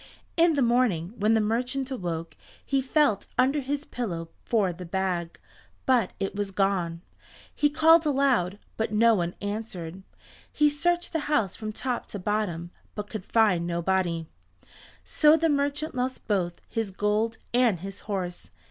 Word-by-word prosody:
In 335 -1 +5
the 280 - +3
morning, 230 -7 +2
when 215 +1 +2
the - - +4
merchant 250 +5 -1
awoke, 170 -8 -4 0.3
he 275 -1 +1
felt 265 -5 +2
under 270 +4 +3
his 285 +2 -3
pillow 170 -9 -4
for 205 -6 +1
the 180 +2 -9
bag, 180 -1 -2 0.5
but 245 -7 +3
it 195 - -2
was 205 -1 -2
gone. 185 -4 0 0.5
He 295 - +2
called 320 +2 +6
aloud, 260 -10 +2 0.2
but 220 -1 -1
no 230 +2 +5
one 175 -4 -1
answered. 195 -4 -5 0.5
He 300 -1 +3
searched 350 +5 0
the 315 -2 -2
house 225 -11 +1
from 215 -1 -5
top 250 +3 -3
to - - -5
bottom, 180 -4 -2 0.2
but 210 -1 -6
could 215 -4 -5
find 185 -7 +3
nobody. 170 -1 0 0.8
So 305 +1 +5
the 325 +1 +2
merchant 285 +1 0
lost 255 +1 -3
both 185 -5 +1
his 225 -3 -2
gold 210 +3 0 0.2
and 235 -8 +3
his 195 0 -6
horse. 185 -3 -3
215 Hz, 155 wpm, -27 LUFS, 185-265 Hz, 0.8 s, called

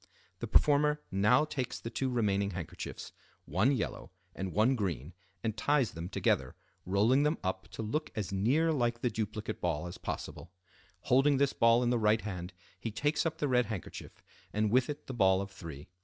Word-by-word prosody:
The - - -4
performer 150 0 +3
now 110 +9 +4
takes 130 -5 -4
the 115 - -6
two 130 +3 -1
remaining 100 -5 +1
handkerchiefs, 90 -3 -6 0.3
one 95 - +2
yellow 135 - -3 0.2
and 95 -1 -4
one 110 +7 +3
green, 85 - -3 0.3
and 110 -2 -1
ties 135 +2 +2
them 85 +2 -6
together, - - 0 0.3
rolling 105 +8 +4
them 150 +2 +2
up 95 0 -2
to - - -6
look 150 +9 -2
as 105 -3 -3
near 130 +12 +2
like 120 -5 0
the 125 - +1
duplicate 110 0 -4
ball 85 -2 -1
as 90 - -7
possible. - - -6 0.5
Holding 135 +2 +4
this 140 0 +2
ball 115 +1 +4
in 120 - +2
the 120 - +2
right 110 0 +3
hand, 90 -3 -5 0.3
he 115 - -3
takes 145 +9 0
up 160 - -4
the 145 - 0
red 125 -3 +2
handkerchief, 105 -7 -7 0.3
and 105 0 0
with 125 +2 +3
it 145 - -5
the 130 - -6
ball 95 -5 +4
of 100 0 -5
three. 80 -7 -9
110 Hz, 185 wpm, -31 LUFS, 95-130 Hz, 0.5 s, now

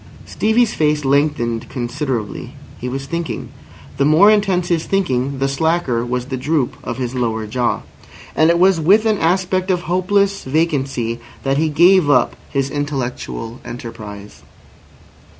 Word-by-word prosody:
Stevie's 220 +1 +1
face 150 -1 +1
lengthened 135 -5 +1
considerably. 125 -3 -4 0.3
He 125 - -4
was 135 +2 -4
thinking. 170 +2 -4 0.5
The - - +2
more 160 +9 +6
intense 190 -4 +1
his 165 -2 +1
thinking, 140 -8 0
the 135 +1 0
slacker 140 -4 0
was 125 0 -2
the 130 0 -4
droop 145 0 0
of 120 - -4
his 125 -1 -3
lower 115 -3 -1
jaw. 120 +3 -1 0.5
And 160 +1 +4
it 170 - +4
was 185 -1 +4
with 200 +8 +4
an 215 -2 +2
aspect 185 +2 +1
of 180 -2 +1
hopeless 195 +3 +1
vacancy 135 -6 -1 0.2
that 135 0 +1
he 160 0 +2
gave 170 +1 +5
up 125 -4 +3
his 135 -1 -1
intellectual 130 -4 -4
enterprise. 110 -4 -9
145 Hz, 145 wpm, -18 LUFS, 125-175 Hz, 0.5 s, more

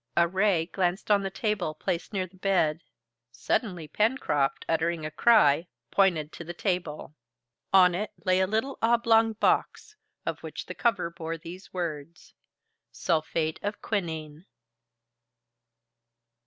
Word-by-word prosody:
A 170 0 +5
ray 190 -2 +2
glanced 185 +3 -1
on 200 -1 +5
the 195 - -2
table 195 -6 -2
placed 170 +4 -3
near 190 -3 -1
the 185 +1 -18
bed. 180 -5 +1 0.5
Suddenly 175 - -2
Pencroft, 180 - 0
uttering 165 0 0
a 155 - -4
cry, 165 -4 +4 0.2
pointed 170 -6 +2
to - - -8
the 175 +1 -7
table. 175 -6 -3 0.6
On 185 -2 +6
it 205 +4 -2 0.2
lay 185 0 +3
a 190 - +2
little 220 +7 -1
oblong 225 -1 +4
box, 320 - 0 0.3
of - - -3
which - - -7
the - - -6
cover 195 -8 0
bore 165 -1 -5
these 175 +4 -11
words: 170 -2 -6 0.6
"SULPHATE 155 +4 -1
OF 205 +1 -3
QUININE." 160 -4 -4
180 Hz, 130 wpm, -27 LUFS, 160-205 Hz, 0.6 s, On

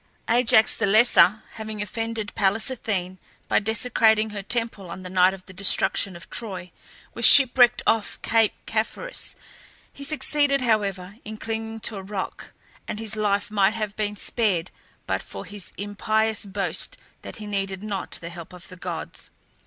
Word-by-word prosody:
Ajax 225 -2 +4
the - - 0
Lesser 215 -1 +5
having 220 -1 -6
offended 220 +1 -4
Pallas 205 +6 +2
Athene 185 -7 -3 0.3
by - - +3
desecrating 220 0 +2
her 205 -1 -5
temple 225 -3 -2
on 185 - -8
the 180 - -8
night 185 0 +5
of 190 -1 -10
the 190 - -13
destruction 195 0 +1
of 170 - -9
Troy, 185 -6 -4 0.4
was 235 - -6
shipwrecked 245 -1 +8
off 225 -2 +1
Cape 225 -2 +2
Caphareus. - - -3 0.6
He 280 - -10
succeeded, 285 -1 +1
however, 200 -4 -1
in 215 0 -7
clinging 225 0 -4
to 215 - -3
a - - -5
rock, 190 0 -6 0.4
and - - -4
his 220 0 0
life 205 -1 0
might 205 0 +2
have 215 -2 -3
been 210 -1 -2
spared 200 -6 0 0.3
but - - -1
for - - -8
his 205 -2 -6
impious 215 +1 0
boast 195 0 -2 0.2
that - - -8
he 215 - -8
needed 195 -1 -3
not 205 -2 -4
the 170 - -6
help 170 0 -10
of 180 -1 -11
the 185 - -11
gods. - - -6
210 Hz, 160 wpm, -24 LUFS, 195-225 Hz, 0.6 s, shipwrecked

